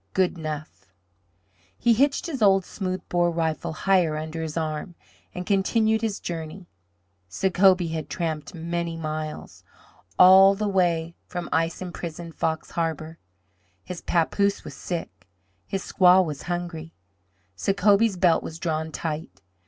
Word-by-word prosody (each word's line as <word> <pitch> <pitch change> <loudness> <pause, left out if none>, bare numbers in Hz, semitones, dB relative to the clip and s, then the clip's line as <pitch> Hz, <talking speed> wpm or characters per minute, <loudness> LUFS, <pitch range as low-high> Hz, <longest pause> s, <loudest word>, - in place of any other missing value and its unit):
Good 185 -1 +2
'nough!" 155 - -7 0.9
He 235 - +3
hitched 275 +5 +2
his 290 -8 -4
old 195 -2 +4
smooth 185 -2 -4
bore 175 -1 +2
rifle 165 -2 -2
higher 170 -2 +2
under 160 +1 -5
his 160 0 -4
arm 155 +2 -3 0.4
and 180 0 -4
continued 220 +3 +2
his 220 -3 -2
journey. 165 +2 -6 0.6
Sacobie 185 - +3
had 155 -2 -4
tramped 160 -3 -4
many 170 0 -3
miles 155 -1 -5 0.5
all 190 +2 +8
the 210 +1 -2
way 170 -4 +1
from 175 -1 -5
ice 165 +3 0
imprisoned 170 -2 -7
Fox 160 0 -2
Harbor. 160 -1 -3 0.6
His 180 -2 -7
papoose 200 +4 +1
was - - -8
sick. 170 - -6 0.4
His 195 - -3
squaw 185 0 +5
was 150 -4 -5
hungry. 170 -2 -4 0.6
Sacobie's 200 - +2
belt 175 -2 +3
was 160 - -7
drawn 160 -2 -2
tight. 150 - -5
170 Hz, 130 wpm, -25 LUFS, 160-190 Hz, 0.9 s, all